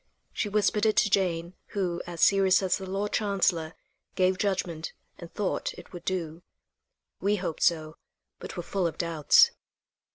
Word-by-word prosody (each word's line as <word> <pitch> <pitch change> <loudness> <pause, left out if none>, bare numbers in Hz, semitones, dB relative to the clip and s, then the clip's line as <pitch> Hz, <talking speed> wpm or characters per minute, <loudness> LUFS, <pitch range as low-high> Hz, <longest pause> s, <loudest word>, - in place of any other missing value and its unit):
She 210 - -2
whispered 210 +1 +2
it 215 - +2
to 205 - +3
Jane, 175 -3 0 0.2
who, 175 -3 -1
as 170 -2 -6
serious 195 -1 +4
as 185 +1 +1
the 190 -1 -7
Lord 200 +2 -2
Chancellor, 185 -6 0 0.4
gave 185 0 +2
judgment, 180 -5 -2 0.3
and 170 -1 -10
"thought 205 -3 -2
it - - -13
would 175 -1 -9
do." 170 -3 -3 0.8
We 205 +1 +1
hoped 180 -5 -4
so, 155 -2 +1 0.4
but - - -8
were 175 - -3
full 185 0 -1
of 165 - -6
doubts. 165 -4 +4
185 Hz, 160 wpm, -27 LUFS, 170-195 Hz, 0.8 s, serious